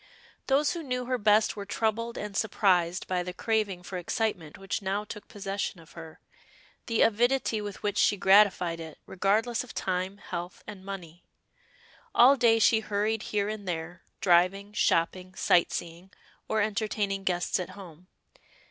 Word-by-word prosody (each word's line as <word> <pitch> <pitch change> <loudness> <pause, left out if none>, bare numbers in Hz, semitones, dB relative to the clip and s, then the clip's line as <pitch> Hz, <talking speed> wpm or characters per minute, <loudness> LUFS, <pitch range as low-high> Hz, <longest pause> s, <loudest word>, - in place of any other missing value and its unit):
Those 280 +2 +3
who 340 - -5
knew 250 -4 -3
her 255 0 -1
best 210 +1 +3
were 205 - -5
troubled 225 +3 -2
and 210 -1 -6
surprised 185 -4 +1
by 180 -1 -1
the 180 0 -6
craving 210 -5 -1
for 180 0 -5
excitement 175 -4 -3
which 195 +1 -4
now 200 +2 -1
took 210 0 -9
possession 200 -4 -4
of 160 - -17
her, 165 -2 -11 0.7
the 230 -1 +3
avidity 235 0 +2
with 205 -2 -7
which 205 -1 0
she 205 - +3
gratified 190 -4 +4
it, 160 -2 -9
regardless 220 +6 0
of 250 - -12
time, 185 +1 -2
health, 175 -2 -7
and 205 -3 -9
money. 180 -4 -8 0.9
All 255 +4 +7
day 230 -3 +4
she 225 0 +4
hurried 215 +1 -1
here 205 -1 0
and 210 -2 -5
there, 170 0 -4 0.2
driving, 190 +3 +3
shopping, 185 -1 0
sight 175 - +3
seeing, 175 +2 -6 0.4
or 220 -1 +1
entertaining 205 -2 -2
guests 180 0 0
at 180 - -4
home. 180 -2 -12
200 Hz, 155 wpm, -28 LUFS, 180-220 Hz, 0.9 s, All